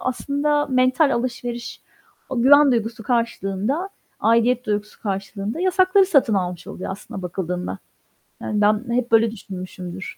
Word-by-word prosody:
aslında 290 +3 0
mental 255 +2 +3
alışveriş. 240 0 -4 0.5
O 245 -3 -1
güven 285 +1 +7
duygusu 230 0 -2
karşılığında, 235 - -1 0.3
aidiyet 235 +2 +2
duygusu 210 0 -3
karşılığında 200 - -4
yasakları 370 +1 +4
satın 275 - +3
almış 180 -2 -2
oluyor 185 - -6
aslına 190 0 -7
bakıldığında. 180 0 -4 0.6
Yani, 210 -1 -1
ben 210 +2 +3
hep 250 -1 -1
böyle 225 0 +4
düşünmüşümdür. 185 -2 -8
230 Hz, 125 wpm, -22 LUFS, 195-260 Hz, 0.6 s, güven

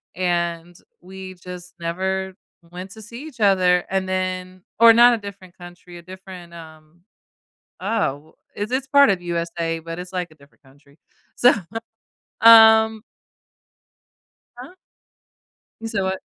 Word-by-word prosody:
and 175 -1 -2 0.3
we've 185 0 -11
just 180 -1 -10
never 190 +2 -3 0.4
went 185 +2 -9
to 220 - -12
see 235 +6 -10
each 245 -7 -13
other. 185 -3 +3
And 190 0 -2
then 185 0 -4 0.2
or 230 -1 +8
not 240 +1 +6
a - - 0
different 200 -3 -12
country, 175 0 -13
a - - -11
different, 185 -1 -12
um, 160 0 -15 0.8
oh, 160 -8 -3 0.2
is 205 +1 -3
this 260 +1 -2
part 280 -4 +5
of 185 -2 0
USA, 170 -1 -3
but 165 +1 -8
it's 180 0 -8
like 180 -2 -4
a - - -19
different 140 0 -24
country. 140 +2 -24 0.4
So, 245 - +5 0.9
um 220 -1 +7 1.5
Huh? 265 +9 -12 1.1
You 225 - -5
say 205 -3 -2
what? 190 0 -2
185 Hz, 135 wpm, -21 LUFS, 170-205 Hz, 1.5 s, or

